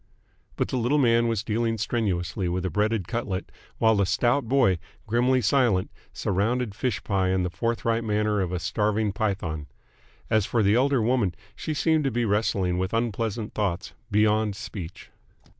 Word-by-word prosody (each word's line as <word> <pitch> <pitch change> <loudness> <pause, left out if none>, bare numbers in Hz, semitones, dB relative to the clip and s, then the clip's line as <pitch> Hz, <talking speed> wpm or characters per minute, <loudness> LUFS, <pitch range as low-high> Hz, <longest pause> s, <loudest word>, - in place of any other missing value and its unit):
But - - -1
the - - -1
little 125 +6 +2
man 120 -3 +4
was 115 -3 -1
dealing 115 0 0
strenuously 95 -5 -1
with 90 +1 -2
a 90 - -1
breaded 105 0 0
cutlet, 110 -6 -3 0.3
while 110 -1 +4
the 100 -2 +2
stout 120 +7 +2
boy, 115 -8 +3 0.3
grimly 125 +3 +2
silent, 115 -5 +2 0.2
surrounded 105 - -1
fish 115 +1 -2
pie 95 -3 +1
in 95 0 +1
the 90 - -2
forthright 115 +4 -1
manner 105 -1 +1
of 90 -2 -2
a 90 - -1
starving 105 +3 0
python. 90 -8 -2 0.6
As 110 -3 +2
for 115 -2 +1
the 100 +1 +4
elder 130 0 +3
woman, 110 -7 +1 0.2
she 155 - -4
seemed 160 +1 +2
to - - +3
be 120 -1 0
wrestling 100 -4 +1
with 95 +3 -2
unpleasant 115 -1 -2
thoughts, 95 -4 -2 0.2
beyond 105 0 +2
speech. 100 -4 -8
105 Hz, 165 wpm, -26 LUFS, 95-115 Hz, 0.6 s, man